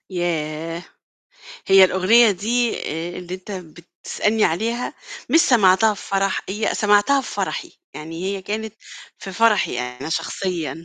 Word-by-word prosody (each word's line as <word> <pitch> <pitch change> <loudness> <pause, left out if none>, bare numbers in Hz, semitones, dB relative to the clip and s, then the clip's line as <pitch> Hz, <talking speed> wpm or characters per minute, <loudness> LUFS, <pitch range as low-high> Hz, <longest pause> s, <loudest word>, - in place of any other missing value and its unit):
ياه! 165 -1 -3 0.8
هي 195 0 +7
الأغنية 205 +5 +4
دي 230 +5 0
آآ 165 +3 -5
اللي 180 0 -7
أنت 185 +2 -10
بتسألني 185 +5 -3
عليها 230 +9 -1 0.4
مش 325 - +6
سمعتها 215 - +4
في - - -11
فرَح، 195 0 0
هي 210 +3 -1
سمعتها 210 +7 +3
في 260 - -8
فرَحي، - - -4 0.2
يعني 165 +3 -7
هي 195 0 -3
كانت 215 +2 -5 0.4
في 195 - -8
فرَحي 210 - +2
أنا 125 +4 -6
شخصيًا. 165 -1 -3
190 Hz, 135 wpm, -21 LUFS, 170-220 Hz, 0.8 s, هي